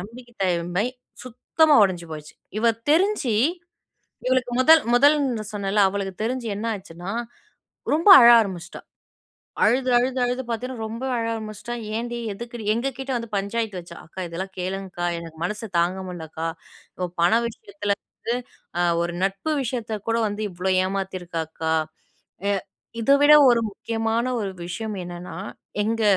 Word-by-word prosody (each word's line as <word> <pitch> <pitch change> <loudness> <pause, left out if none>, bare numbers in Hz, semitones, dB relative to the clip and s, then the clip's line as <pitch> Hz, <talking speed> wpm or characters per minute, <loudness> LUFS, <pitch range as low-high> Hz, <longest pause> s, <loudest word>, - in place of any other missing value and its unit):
நம்பிக்கை 240 +5 -11
தன்மை 180 +3 0 0.4
சுத்தமா 290 +5 +3
உடைஞ்சு 180 -3 -2
போச்சு! 150 -1 -9 0.2
இவ 230 - +1 0.2
தெரிஞ்சு, 335 - +2 0.9
இவளுக்கு 255 -1 +1
முதல் 320 +4 +7
முதல்ன்னு 275 -4 +3
சொன்னேன்ல, 205 0 +1
அவளுக்கு 195 -1 -3
தெரிஞ்சு 245 0 -2
என்ன 215 +3 -4
ஆச்சுன்னா 180 -1 -8 0.8
ரொம்ப 330 +6 +2
அழ 235 - +9
ஆரம்பிச்சுட்டா. 185 -5 -5 0.8
அழுது, 255 +4 +3
அழுது, 255 +2 0
அழுது 250 +1 -1
பார்த்தீங்கன்னா 235 0 -4
ரொம்ப 230 +3 -6
அழ 230 - -1
ஆரம்பிச்சிட்டா. 215 +1 -6 0.2
ஏன்டி? 240 +1 -3 0.2
எதுக்குடி? 235 +2 -8
எங்க 235 +4 -1
கிட்ட 270 0 -4
வந்து 230 -1 -6
பஞ்சாயத்து 200 0 -2
வச்சா, 170 -1 -11
"அக்கா 185 +3 -8
இதெல்லாம் 185 +3 -6
கேளுங்க்கா. 185 -1 -4
எனக்கு 165 -1 -10
மனசு 210 +5 -3
தாங்க 175 +2 +1
முடிலக்கா. 165 -2 -5 0.6
ஒ - - -4
பண 175 - +5 0.2
விஷயத்துல 205 -2 -3
வந்து, 235 - -4 0.4
அ - - +3 0.2
ஒரு 175 0 -3
நட்பு 195 +11 -1
விஷயத்த 230 -4 -3
கூட 230 - +2
வந்து 205 +1 -4
இவ்ளோ 180 +2 -1
ஏமாத்தியிருக்கா 185 -3 -3
அக்கா!" 160 0 -2 0.8
எ - - +2 0.5
இத 230 - +2
விட 290 +1 +8 0.2
ஒரு 240 -1 +4
முக்கியமான 225 +2 -1 0.2
ஒரு 200 - -2 0.2
விஷயம் 215 +4 -4
என்னன்னா, 175 +1 -8 0.5
எங்க 225 +2 -1
215 Hz, 140 wpm, -24 LUFS, 185-240 Hz, 0.9 s, அழ